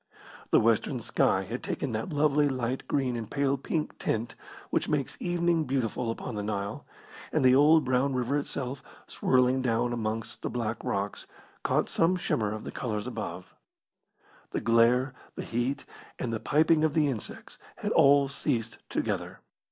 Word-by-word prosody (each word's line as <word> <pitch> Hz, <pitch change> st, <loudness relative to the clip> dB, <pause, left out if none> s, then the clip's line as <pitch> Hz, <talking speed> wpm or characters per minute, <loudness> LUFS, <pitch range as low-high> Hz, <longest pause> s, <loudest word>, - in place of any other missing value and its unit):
The -, -, +5 dB
western -, -, +2 dB
sky 95 Hz, -, +1 dB
had 115 Hz, +6 st, -5 dB
taken 140 Hz, -, -3 dB
that 110 Hz, +9 st, -3 dB
lovely 145 Hz, -1 st, +3 dB
light 130 Hz, -1 st, -2 dB
green 130 Hz, -4 st, 0 dB
and 115 Hz, -2 st, -5 dB
pale 140 Hz, -1 st, +1 dB
pink 150 Hz, +3 st, -3 dB
tint 115 Hz, +2 st, -1 dB, 0.4 s
which -, -, 0 dB
makes 145 Hz, -3 st, -1 dB
evening 170 Hz, -2 st, +1 dB
beautiful 125 Hz, -3 st, -1 dB
upon 115 Hz, +2 st, -4 dB
the 105 Hz, -, -3 dB
Nile, 100 Hz, -1 st, -4 dB, 0.4 s
and -, -, +2 dB
the 130 Hz, -, +7 dB
old 150 Hz, +4 st, +6 dB
brown 130 Hz, +1 st, +1 dB
river 125 Hz, +2 st, 0 dB
itself, 140 Hz, -2 st, -4 dB, 0.3 s
swirling 130 Hz, 0 st, +2 dB
down 120 Hz, -1 st, +1 dB
amongst 115 Hz, -1 st, -2 dB
the -, -, -2 dB
black 115 Hz, -2 st, -3 dB
rocks, 100 Hz, +1 st, -3 dB, 0.3 s
caught -, -, +1 dB
some 165 Hz, +3 st, +2 dB
shimmer 110 Hz, -, 0 dB
of 110 Hz, 0 st, -5 dB
the -, -, -6 dB
colours 105 Hz, -4 st, -3 dB
above. -, -, -6 dB, 1.0 s
The -, -, -3 dB
glare, 120 Hz, +3 st, +3 dB, 0.2 s
the -, -, -4 dB
heat, 120 Hz, +4 st, -2 dB, 0.3 s
and 120 Hz, -2 st, -3 dB
the 110 Hz, -, -1 dB
piping 155 Hz, +6 st, +3 dB
of 155 Hz, -2 st, +1 dB
the 155 Hz, -2 st, +4 dB
insects 125 Hz, -7 st, -5 dB, 0.2 s
had -, -, -3 dB
all 140 Hz, 0 st, +6 dB
ceased 125 Hz, -4 st, -2 dB
together. -, -, -3 dB
125 Hz, 160 wpm, -28 LUFS, 115-140 Hz, 1.0 s, the